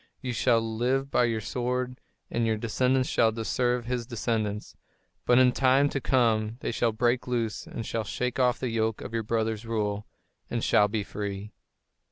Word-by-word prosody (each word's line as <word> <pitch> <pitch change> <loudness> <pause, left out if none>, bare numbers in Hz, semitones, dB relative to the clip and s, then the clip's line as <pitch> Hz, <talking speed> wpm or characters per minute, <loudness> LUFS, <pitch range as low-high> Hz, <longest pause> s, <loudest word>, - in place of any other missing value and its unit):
You 125 -3 -4
shall 115 +1 +3
live 125 +5 -1
by 120 - +4
your 115 -2 -1
sword 125 +2 -2 0.3
and 120 - 0
your 110 -1 +1
descendants 125 +4 +1
shall 115 -1 +3
serve 125 +1 0
his 120 -1 -2
descendants. 110 -3 -2 0.5
But 120 - +5
in 130 -1 +6
time 135 +2 +3
to 135 - -3
come 115 -4 +2
they - - -2
shall 115 0 +1
break 120 +3 +1
loose 115 -3 -2
and 115 - -6
shall 115 - -2
shake 125 +5 -3
off 125 0 +3
the 125 -3 -3
yoke 110 -1 0
of - - -7
your 115 - 0
brother's 110 0 -1
rule 105 -2 -2 0.4
and - - -2
shall 105 - +4
be 105 0 -2
free." 100 0 -5
115 Hz, 180 wpm, -27 LUFS, 110-125 Hz, 0.5 s, in